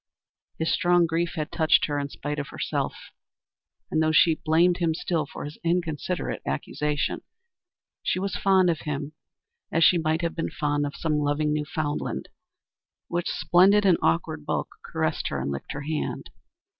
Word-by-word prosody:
His 160 - 0
strong 175 -3 +4
grief 165 +1 -1
had 155 -2 -3
touched 160 -1 +4
her 145 -1 -1
in 140 0 -3
spite 150 +1 -4
of 140 - -4
herself, - - -2 1.0
and, 160 - +2
though 155 0 +3
she 160 +1 +5
blamed 170 +3 +4
him 165 -3 +1
still 160 -3 -1
for - - -7
his 150 +1 -9
inconsiderate 170 0 -1
accusation, 150 -1 -2 0.8
she - - 0
was 195 +1 -2
fond 190 -2 +4
of 160 - -3
him 145 0 -4 0.6
as 165 - +3
she 175 +2 +6
might 160 +1 0
have 170 - 0
been 165 - -2
fond 145 -2 0
of 145 - -7
some 155 -2 0
loving 150 +1 +1
Newfoundland, 150 0 -2 0.8
which, 175 0 -1
splendid 195 +4 +4
in 180 -4 +5
awkward 80 0 0
bulk, - - -2
caressed - - -1
her 70 - -2
and 70 +2 -2
licked 70 - -5
her 145 - -5
hand. 155 +1 -3
160 Hz, 165 wpm, -26 LUFS, 150-175 Hz, 1.0 s, she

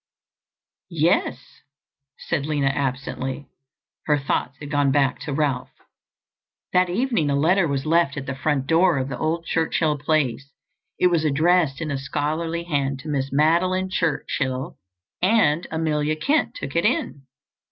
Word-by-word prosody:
"Yes," - - 0 0.6
said 140 - -2
Lina 145 -3 +1
absently; 135 0 -3 0.6
her 150 -1 +3
thoughts 135 -1 -2
had 145 -1 -9
gone 145 -2 +2
back 135 -2 +2
to 150 - -5
Ralph. 140 -3 -1 1.0
That 180 0 +3
evening 215 - 0
a 140 - +1
letter 170 +5 +3
was 140 -1 -2
left 165 -2 +2
at 135 - -4
the 135 - -3
front 135 0 -1
door 165 +1 +3
of 130 0 -2
the 125 - -4
old 165 +2 -1
Churchill 160 -2 0
place. 140 -3 0 0.5
It 180 - +3
was 165 -2 +2
addressed 155 0 +2
in 155 -2 -3
a 140 - -2
scholarly 155 +4 -2
hand 140 -5 -1
to 155 - -8
Miss 135 -2 -1
Madeline 180 +6 +2
Churchill, 135 -4 -2 0.4
and 180 -5 +3
Amelia 155 -1 0
Kent 290 - 0
took - - -6
it - - +2
in. 145 - -1
150 Hz, 145 wpm, -23 LUFS, 140-170 Hz, 1.0 s, her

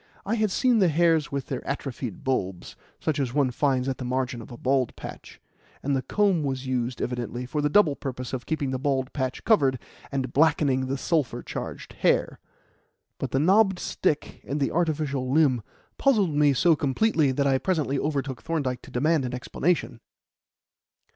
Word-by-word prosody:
I 205 - -1
had 215 -2 +2
seen 245 +4 +3
the 190 - +5
hairs 165 -1 +2
with 140 -2 -2
their 130 - -4
atrophied 130 -6 -5
bulbs 95 -9 -2 0.2
such 155 -2 -1
as 130 -2 -2
one 140 -3 +2
finds 130 0 +1
at 135 - -2
the - - -4
margin 125 -1 -2
of 115 - -12
a 120 - -8
bald 130 -1 +1
patch; - - -10 0.4
and 140 0 +1
the 130 - 0
comb 195 +4 +2
was 135 -2 -2
used, 125 -1 -2
evidently, 125 0 -3
for 150 +4 -2
the 150 - +1
double 155 -4 +4
purpose 130 -2 -6
of 130 -2 -4
keeping 145 -4 -1
the 130 - -2
bald 135 -1 -1
patch 130 -3 -3
covered 140 - +3 0.3
and 130 -2 -2
blackening 140 -3 +3
the 135 +1 -1
sulphur 150 0 -1
charged - - -6
hair. - - +1 0.8
But - - -2
the - - 0
knobbed 195 +5 +4
stick 155 -4 -2
and 145 +2 -3
the 140 - 0
artificial 150 -6 -1
limb 140 -5 +3 0.4
puzzled 210 - +3
me 145 -1 +4
so 165 +4 +4
completely 145 - +2
that 140 +2 0
I 135 -1 +3
presently 150 -7 0
overtook 140 -4 -2
Thorndyke 140 -7 -2
to - - -13
demand 150 +4 +1
an 125 0 -3
explanation. 135 -1 -1
140 Hz, 180 wpm, -26 LUFS, 130-160 Hz, 0.8 s, the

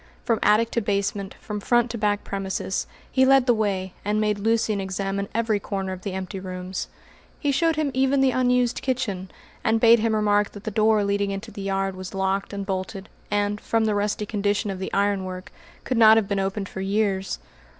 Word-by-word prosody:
From 230 -3 +2
attic 225 +2 +3
to 235 - 0
basement, 200 -1 -2
from 210 -1 -5
front 240 +3 +2
to 235 - -4
back 205 -1 +1
premises, 190 -1 -3 0.2
he 260 - +3
led 270 -1 +5
the 245 - +5
way, 195 -4 -1
and 210 +1 0
made 210 -1 +1
Lucian 220 -1 +1
examine 195 +1 -2
every 225 -2 +1
corner 195 -2 -3
of 185 - -8
the 195 -1 -4
empty 190 +1 -4
rooms. 185 0 -5 0.5
He 290 - +1
showed 325 +4 +2
him 305 -2 0
even 270 +1 +2
the 270 -1 +4
unused 250 -1 +2
kitchen, 210 -8 -2 0.3
and 225 0 +2
bade 230 0 +7
him 220 0 +1
remark 205 -1 +2
that 205 - -10
the 220 - -3
door 215 0 +3
leading 200 0 0
into 195 +3 -5
the 200 - -8
yard 195 -1 -1
was 185 0 -7
locked 195 +1 -1
and 200 -1 -4
bolted, 190 0 -4 0.2
and, 205 0 0
from 225 -1 +1
the 215 - +1
rusty 205 +1 -1
condition 205 0 0
of 190 - -6
the 190 - -4
ironwork, 190 -2 -1 0.3
could 255 -3 -1
not 220 -1 +8
have 215 -3 +2
been 200 -1 0
opened 195 +1 -2
for 190 - -6
years. 195 -1 0
205 Hz, 200 wpm, -24 LUFS, 195-225 Hz, 0.5 s, not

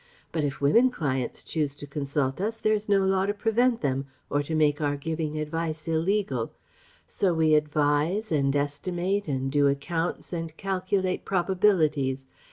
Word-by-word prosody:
But 160 - -1
if 140 -2 -2
women 230 - +5
clients 135 - -2
choose 150 -3 -1
to 145 - -9
consult 140 0 -2
us 225 +3 -1
there 215 -1 +2
is 210 0 -2
no 195 -1 +4
law 190 0 +2
to 205 - -1
prevent 230 +3 +2
them, 135 -1 -1 0.2
or 145 - +2
to 160 +2 -3
make 150 -1 +2
our 145 -1 0
giving 155 +1 -3
advice 155 +1 -3
illegal. 165 - 0 0.5
So 185 -4 0
we 160 -1 +3
advise 150 +7 +1
and 140 -2 +2
estimate 175 +7 -1
and 135 -2 -1
do 145 0 +4
accounts 165 +6 -2
and 165 -2 -4
calculate 190 -1 -1
probabilities. 165 -8 +1
160 Hz, 160 wpm, -27 LUFS, 145-190 Hz, 0.5 s, women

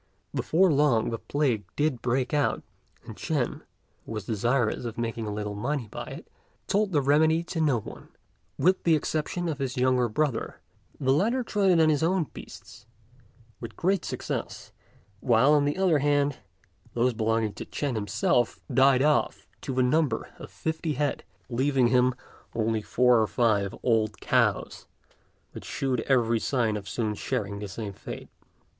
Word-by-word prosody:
Before 180 +2 +3
long 135 -6 +2
the 115 - -3
plague 135 -8 0
did 145 -5 0
break 125 +3 0
out; 145 -1 +1 0.4
and - - -9
Ch'ên, - - -2 0.4
who - - -10
was 105 -3 -5
desirous 120 +2 0
of 115 -2 -5
making 115 -1 -3
a - - -3
little 105 0 -4
money 120 +4 -2
by - - -6
it, - - -9 0.4
told 205 0 +1
the 145 -4 +2
remedy 155 +4 +3
to 170 -1 -3
no 140 -7 +2
one, - - -11 0.5
with 185 +2 +3
the 165 -2 +4
exception 155 +3 -2
of 155 -3 -3
his 135 -1 -3
younger 125 -1 +2
brother. 135 0 -1 0.4
The 130 -1 +2
latter 230 - +1
tried 205 -4 +1
it 175 -2 +5
on 160 -1 +5
his 150 -2 +2
own 175 +2 +2
beasts 105 - -12 0.7
with 115 -2 -8
great 185 -1 +1
success; - - -5 0.5
while, 125 +5 +4
on 145 -1 +4
the 145 +3 -1
other 180 -6 +3
hand, 145 -1 +1 0.6
those 120 +1 +2
belonging 110 -1 0
to - - -7
Ch'ên 145 -3 -3
himself 110 +2 0
died 130 +1 +5
off, 150 0 +1 0.2
to - - -4
the 130 - +3
number 130 -2 +1
of - - -9
fifty 160 0 -3
head, 145 +1 -1 0.2
leaving 130 0 +2
him 125 0 +3 0.4
only 110 -1 0
four 125 +1 +3
or 110 - +1
five 105 -5 +1
old 110 -3 +1
cows, - - 0 0.6
which - - -9
shewed 130 -3 -2
every 115 -4 +3
sign 115 -3 0
of 100 -1 -6
soon 110 +1 -1
sharing 105 -3 -3
the 105 - -5
same 100 +2 -6
fate. - - -9
130 Hz, 165 wpm, -27 LUFS, 115-150 Hz, 0.7 s, it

